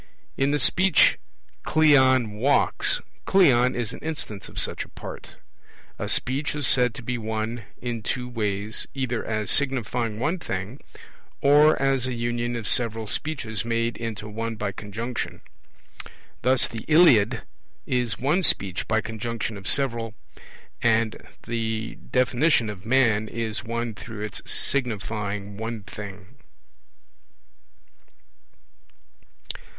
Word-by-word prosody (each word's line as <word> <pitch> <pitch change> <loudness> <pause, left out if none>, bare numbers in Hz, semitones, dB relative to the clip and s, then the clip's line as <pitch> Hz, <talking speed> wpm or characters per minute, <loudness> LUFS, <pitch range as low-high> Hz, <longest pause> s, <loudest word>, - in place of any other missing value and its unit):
In 135 +1 +1
the 145 - +2
Speech 175 +5 +4 0.4
'Cleon 130 -7 +4
walks', 125 +7 +3 0.2
'Cleon' 130 -10 +4
is 120 -2 -2
an - - -8
instance 140 -11 -5
of - - -13
such - - -2
a - - -15
part. - - -9 0.7
A - - -3
Speech 135 +4 -1
is 145 -2 -1
said 125 -3 +4
to 125 - -8
be 125 0 -3
one 110 +1 -3
in 120 -2 -4
two 125 +3 -3
ways, 105 -3 -2
either 125 -3 -2
as 110 -2 0
signifying 120 -5 +1
one 160 +9 0
thing, 100 - -5 0.6
or 150 +2 +5
as 135 -2 +1
a 125 - -3
union 120 0 -2
of 115 -4 -4
several 115 -2 +1
Speeches 115 -3 -3
made 115 0 -1
into 110 -2 -5
one 115 +2 -4
by 105 -2 -3
conjunction. 110 +5 -5 1.0
Thus 130 +1 +3
the 115 -1 -7
Iliad 125 -9 +5 0.4
is 120 -5 0
one 150 +9 +1
Speech 100 - +2
by 110 0 +2
conjunction 110 0 -4
of 100 -1 -8
several; 115 -5 +2 0.7
and 115 -1 +1 0.2
the 115 -1 -2 0.2
definition 125 -2 +2
of 100 0 -11
man 115 -4 +3
is 110 -1 -3
one 115 0 -3
through 105 +2 -9
its 105 -1 -5
signifying 105 -5 -1
one 110 -1 -5
thing. 100 +3 -10
115 Hz, 125 wpm, -25 LUFS, 110-130 Hz, 1.0 s, or